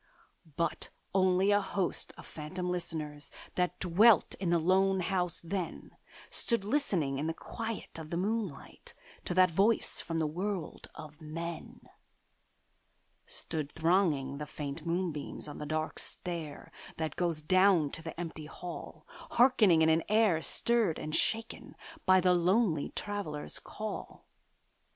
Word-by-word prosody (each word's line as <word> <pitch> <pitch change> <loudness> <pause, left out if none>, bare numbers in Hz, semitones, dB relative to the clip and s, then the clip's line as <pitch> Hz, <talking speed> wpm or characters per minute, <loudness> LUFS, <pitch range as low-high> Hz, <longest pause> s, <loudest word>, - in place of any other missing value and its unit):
But 170 -2 0 0.2
only 190 +1 +4
a 205 0 +4
host 195 -2 -2
of - - -11
phantom 180 +4 -4
listeners 155 -4 -4 0.2
That 180 -1 0
dwelt 200 +5 +5
in 185 -3 -1
the 170 - +4
lone 190 +3 +3
house 180 -2 0
then 180 0 -4 0.4
Stood 235 -4 0
listening 185 - +1
in 155 - -1
the 165 - -2
quiet 225 -5 -6
of 155 -1 -8
the 170 - -2
moonlight 200 -5 -3 0.3
To 175 - -1
that 185 -1 +6
voice 200 +7 +2
from 165 - -3
the 160 - +1
world 180 +2 -4
of 150 +1 -10
men: 165 +2 -6 1.5
Stood 150 -2 -4
thronging 160 -5 +1
the 150 - -5
faint 150 +2 -5
moonbeams 165 -5 -2
on 145 - -8
the 150 - -5
dark 155 +1 -2
stair, 165 -5 -5 0.3
That 160 -1 -2
goes 170 -3 0
down 185 -3 +4
to 165 - -5
the 165 0 -7
empty 160 -3 -5
hall, 175 +2 -8
Hearkening 215 -10 +4
in 160 - +5
an 160 +1 +4
air 210 -6 +4
stirred 230 -6 +1
and 155 +1 -3
shaken 225 0 -1 0.3
By 185 0 +7
the 180 0 +4
lonely 180 -2 +2
Traveller's 200 -8 -4
call. 215 0 -7
175 Hz, 140 wpm, -31 LUFS, 155-195 Hz, 1.5 s, By